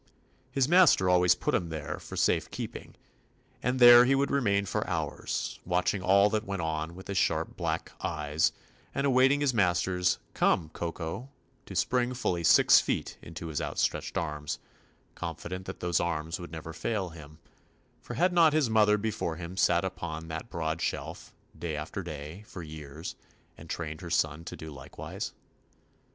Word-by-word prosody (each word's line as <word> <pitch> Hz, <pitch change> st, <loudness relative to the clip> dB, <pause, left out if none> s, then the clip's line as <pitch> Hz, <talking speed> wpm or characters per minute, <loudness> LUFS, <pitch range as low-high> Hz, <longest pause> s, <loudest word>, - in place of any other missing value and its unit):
His 135 Hz, -2 st, +2 dB
master 175 Hz, -, +6 dB
always 90 Hz, -1 st, +5 dB
put -, -, -2 dB
him 85 Hz, -2 st, 0 dB
there 80 Hz, -2 st, -5 dB
"for -, -, -8 dB
safe -, -, +2 dB
keeping," -, -, -7 dB, 0.7 s
and 125 Hz, +1 st, 0 dB
there 120 Hz, -1 st, +10 dB
he 135 Hz, +2 st, +4 dB
would 140 Hz, +1 st, +1 dB
remain 100 Hz, -7 st, +2 dB
for 100 Hz, -, -2 dB
hours, -, -, -3 dB
watching 90 Hz, +2 st, 0 dB
all 100 Hz, +2 st, +5 dB
that 110 Hz, -1 st, 0 dB
went 100 Hz, -4 st, -3 dB
on 80 Hz, +1 st, -3 dB
with 95 Hz, +1 st, -11 dB
his 100 Hz, -1 st, 0 dB
sharp -, -, 0 dB
black -, -, -2 dB
eyes, 75 Hz, 0 st, +1 dB, 0.4 s
and 140 Hz, -, 0 dB
awaiting 135 Hz, +1 st, +4 dB
his 140 Hz, -3 st, +2 dB
master's 90 Hz, -3 st, +2 dB, 0.2 s
"Come, 80 Hz, -4 st, +2 dB
Kokol" 85 Hz, +9 st, -5 dB, 0.4 s
to -, -, -8 dB
spring 125 Hz, 0 st, +1 dB
ful 125 Hz, -, 0 dB
ly 85 Hz, -, -3 dB
six 85 Hz, -, +7 dB
feet -, -, -2 dB
into 80 Hz, +1 st, -8 dB
his 80 Hz, 0 st, -3 dB
outstretched 75 Hz, -1 st, -1 dB
arms, 75 Hz, -2 st, -3 dB, 0.6 s
confident 90 Hz, +2 st, -6 dB
that -, -, -7 dB
those 90 Hz, -2 st, +1 dB
arms 80 Hz, -1 st, -2 dB
would 85 Hz, -, -8 dB
never 80 Hz, 0 st, -7 dB
fail 100 Hz, +1 st, -2 dB
him, 75 Hz, -2 st, -12 dB, 0.6 s
for -, -, -7 dB
had 180 Hz, +1 st, +2 dB
not 165 Hz, -3 st, +6 dB
his 150 Hz, -7 st, +2 dB
mother 105 Hz, -1 st, +5 dB
be 110 Hz, +1 st, -1 dB
fore 85 Hz, -5 st, -3 dB
him 85 Hz, +2 st, -7 dB
sat 90 Hz, -1 st, +3 dB
upon 85 Hz, -3 st, -5 dB
that 80 Hz, +8 st, -5 dB
broad 80 Hz, -2 st, -2 dB
shelf, -, -, -4 dB, 0.2 s
day 80 Hz, -3 st, -4 dB
after 75 Hz, +6 st, -4 dB
day, 80 Hz, +2 st, -7 dB
for 90 Hz, -, -8 dB
years, 75 Hz, +1 st, -8 dB, 0.4 s
and 80 Hz, -, -13 dB
trained 80 Hz, -2 st, -4 dB
her 85 Hz, -, -7 dB
son 75 Hz, 0 st, 0 dB
to -, -, -6 dB
do 80 Hz, -1 st, -9 dB
likewise 70 Hz, -3 st, -7 dB
*? -, -, -37 dB
90 Hz, 175 wpm, -29 LUFS, 80-105 Hz, 0.7 s, there